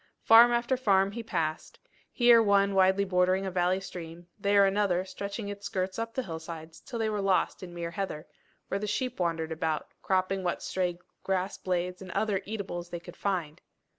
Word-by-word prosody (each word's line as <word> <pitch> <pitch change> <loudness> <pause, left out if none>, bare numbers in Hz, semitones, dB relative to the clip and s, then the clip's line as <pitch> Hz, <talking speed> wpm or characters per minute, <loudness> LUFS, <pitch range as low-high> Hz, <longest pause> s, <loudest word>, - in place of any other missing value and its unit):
Farm 230 +2 +8
after 240 +2 +1
farm 195 -5 +3
he 235 +3 -5
passed, 155 -8 -3 0.3
here 240 -2 +6
one 200 -2 +3
widely 190 +1 +4
bordering 185 +1 +2
a 190 - -3
valley 180 +1 +1
stream, 175 -2 -9
there 200 0 +4
another 195 -2 +1
stretching 200 +2 -5
its 205 0 -5
skirts 185 +2 -2
up 230 0 -4
the 260 - -1
hillsides 160 -2 -8
till 240 - -7
they 225 -1 0
were 210 -1 -1
lost 195 -1 +1
in 180 -2 -8
mere 170 -1 -5
heather, 170 -4 -4 0.4
where 195 - -2
the 210 - -3
sheep 250 +3 -2
wandered 165 -2 -1
about, 160 -1 -2
cropping 190 0 0
what 180 -1 -2
stray 180 -2 -1 0.2
grass 190 0 -2
blades 180 0 -2
and 190 - -9
other 205 -3 0
eatables 190 -5 -5
they 175 - -5
could 170 - -12
find. 175 -7 -2
190 Hz, 185 wpm, -29 LUFS, 175-205 Hz, 0.4 s, Farm